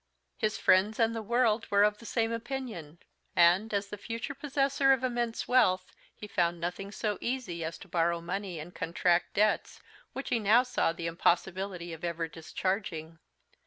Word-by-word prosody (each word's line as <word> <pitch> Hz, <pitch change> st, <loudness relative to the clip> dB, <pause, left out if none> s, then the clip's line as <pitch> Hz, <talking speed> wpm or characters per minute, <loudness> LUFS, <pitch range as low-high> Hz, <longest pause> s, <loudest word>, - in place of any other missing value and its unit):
His 215 Hz, -3 st, -1 dB
friends 205 Hz, +5 st, +3 dB
and 230 Hz, 0 st, +3 dB
the 225 Hz, -, -2 dB
world 230 Hz, 0 st, +1 dB
were 200 Hz, 0 st, +5 dB
of 210 Hz, 0 st, +2 dB
the 230 Hz, -, -11 dB
same 230 Hz, -1 st, 0 dB
opinion; 230 Hz, -, -5 dB, 0.4 s
and, 175 Hz, +6 st, +5 dB
as 200 Hz, -1 st, 0 dB
the 210 Hz, -, -7 dB
future 230 Hz, +5 st, -4 dB
possessor 275 Hz, -1 st, +1 dB
of 260 Hz, -1 st, -1 dB
immense 240 Hz, -2 st, -1 dB
wealth, 185 Hz, -8 st, +3 dB, 0.2 s
he -, -, -9 dB
found 175 Hz, -4 st, 0 dB
nothing 180 Hz, +4 st, -4 dB
so 210 Hz, -1 st, -2 dB
easy 235 Hz, -10 st, -3 dB
as 160 Hz, +1 st, -4 dB
to -, -, -13 dB
borrow 170 Hz, 0 st, +1 dB
money 180 Hz, +1 st, -4 dB
and 165 Hz, +4 st, -9 dB
contract 175 Hz, +1 st, 0 dB
debts, 210 Hz, +1 st, +1 dB, 0.3 s
which 270 Hz, -, -5 dB
he 235 Hz, -, +2 dB
now 220 Hz, +4 st, +5 dB
saw 250 Hz, -9 st, +1 dB
the 170 Hz, 0 st, -6 dB
impossibility 175 Hz, +1 st, 0 dB
of 160 Hz, -, -10 dB
ever 170 Hz, -1 st, -2 dB
discharging. 165 Hz, -1 st, -4 dB
200 Hz, 170 wpm, -30 LUFS, 170-230 Hz, 0.4 s, were